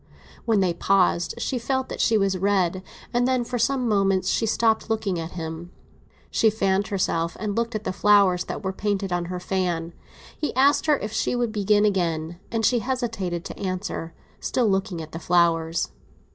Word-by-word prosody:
When 220 -4 +3
they 180 -2 +2
paused 180 -2 +2
she 255 - -2
felt 260 +2 -1
that - - -3
she 225 - +3
was 195 -2 +1
red; 185 -1 +1 0.3
and 245 +1 +2
then, 255 -1 +1
for 245 +1 -3
some 250 +2 +1
moments, 195 -3 +2
she 225 - +1
stopped 225 0 +1
looking 210 -5 -1
at 165 +1 -6
him. 165 0 -6 0.6
She 225 - +4
fanned 200 -2 0
herself, 170 -4 -1
and 210 -2 -2
looked 235 0 -1
at 215 - -3
the - - -2
flowers 200 -3 +4
that - - -6
were 190 0 -2
painted 200 -2 -1
on 175 -1 -1
her 180 +1 -4
fan. 175 -3 -2 0.4
He 300 - -3
asked 280 +4 +4
her 300 -2 +4
if 210 -3 -5
she 245 - 0
would 240 -2 0
begin 210 0 +2
again, 170 -4 -1
and 225 -1 0
she 245 - +3
hesitated 225 -9 -3
to - - -8
answer, 185 -3 -4 0.2
still 245 -3 0
looking 190 -4 -1
at 155 - -11
the 165 - -6
flowers. 165 -1 +1
195 Hz, 185 wpm, -24 LUFS, 175-225 Hz, 0.6 s, She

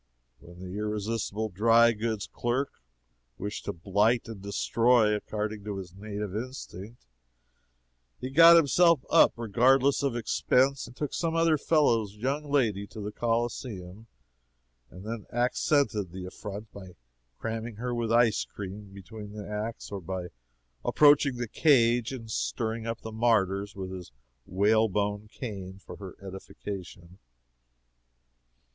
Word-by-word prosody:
When 85 +5 -14
the 95 +2 -6
irresistible 105 0 -2
dry 115 +4 +5
goods 110 -2 -2
clerk 125 +4 -3 0.6
wished 105 +7 -5
to - - -1
blight 105 +8 +1
and 110 -4 -8
destroy, 110 +3 +2
according 105 0 -3
to 105 -2 -4
his 90 -3 -8
native 105 0 -5
instinct, 115 -2 -7 1.1
he 130 +1 -5
got 165 +4 +9
himself 170 -1 +4
up - - +6
regardless 125 +5 +3
of 140 -4 0
expense 130 +3 +1
and 120 - -14
took 150 +1 -4
some 165 -1 -1
other 165 -1 +4
fellow's 120 -10 +2
young 140 +7 -2
lady 110 -8 +1
to 110 - -10
the 105 0 -4
Coliseum, 115 -4 -3 0.8
and 90 +3 -12
then 110 -2 -6
accented 120 - +1
the 90 0 -7
affront 105 +3 -8
by 95 -3 -11 0.4
cramming 115 0 -4
her 120 +3 -3
with 115 -1 -1
ice 115 -1 +4
cream 100 0 -8
between 105 +1 -10
the 105 -1 -7
acts, 105 +2 -5
or 100 -1 -5
by 90 0 -5 0.5
approaching 145 -2 +5
the 120 0 -3
cage 120 -3 +3
and 115 -4 -7
stirring 110 - -2
up 115 0 -4
the 110 - -7
martyrs 100 -3 +1
with 95 -1 -6
his 90 -2 -8 0.4
whalebone 105 +1 +1
cane 100 -5 -7
for 100 - -11
her 95 -3 -9
edification. 95 -1 -8
110 Hz, 135 wpm, -28 LUFS, 100-120 Hz, 1.1 s, got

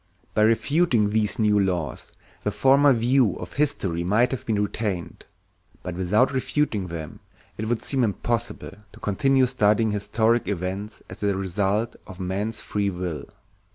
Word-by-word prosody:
By 105 - +2
refuting 115 0 +3
these 105 -1 +1
new 105 -2 +3
laws 90 -8 -1 0.4
the - - +1
former 140 +2 +4
view 120 -1 +3
of 90 - -8
history 100 - 0
might 110 +7 +2
have 130 0 -5
been 110 -2 +1
retained; 100 -4 -4 0.6
but 90 - -4
without 95 +9 +2
refuting 130 -7 -1
them 80 -4 -7 0.4
it 110 - -4
would 120 -2 -1
seem 135 -3 +1
impossible 115 -1 -2 0.2
to - - -14
continue 130 +6 +2
studying 110 -3 +2
historic 110 +2 +1
events 100 +2 -4
as - - -10
the 100 -1 0
results 100 +4 -1
of 95 -3 -11
man's 100 +4 -3
free 100 -1 -1
will. 90 -5 -4
105 Hz, 150 wpm, -24 LUFS, 95-120 Hz, 0.6 s, former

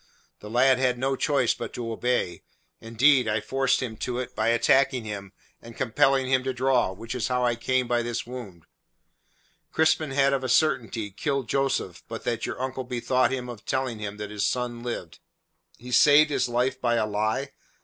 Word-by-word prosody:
The 105 - -10
lad 130 +3 +4
had 125 -1 +1
no 135 +2 0
choice 135 -3 +1
but - - -7
to 115 -2 -4
obey; 120 -6 -1 0.4
indeed, 125 +3 +3
I 105 0 +1
forced 135 +5 0
him 110 -3 -5
to 125 +2 -3
it 125 -1 -5
by - - 0
attacking 125 +2 +3
him 100 -3 -6 0.3
and 115 0 -12
compelling 135 +2 +2
him 130 0 +2
to 130 - -1
draw, 130 -5 +2
which 115 +6 -7
is 125 -4 -2
how 125 -1 0
I 120 -1 +1
came 130 +2 0
by 120 0 +1
this 120 -1 -3
wound. 115 -9 -9 1.1
"Crispin 160 -1 +2
had 135 0 +2
of 135 -1 -1
a 130 - -2
certainty 115 -6 +1
killed 140 +4 -2
Joseph 135 -10 -1
but 115 0 -7
that 115 -1 -2
your - - -5
uncle 130 0 -3
bethought 125 +1 0
him 125 -2 -3
of 120 -3 -9
telling 130 -4 -2
him 105 -1 -5
that 105 0 -6
his 105 -1 -2
son 120 -1 -2
lived." 120 -9 -6 0.6
"He 125 +1 -10
saved 150 +3 +6
his 130 -3 0
life 125 +2 0
by 120 -1 +2
a 110 -2 +1
lie! 110 +6 -1
125 Hz, 190 wpm, -26 LUFS, 115-130 Hz, 1.1 s, saved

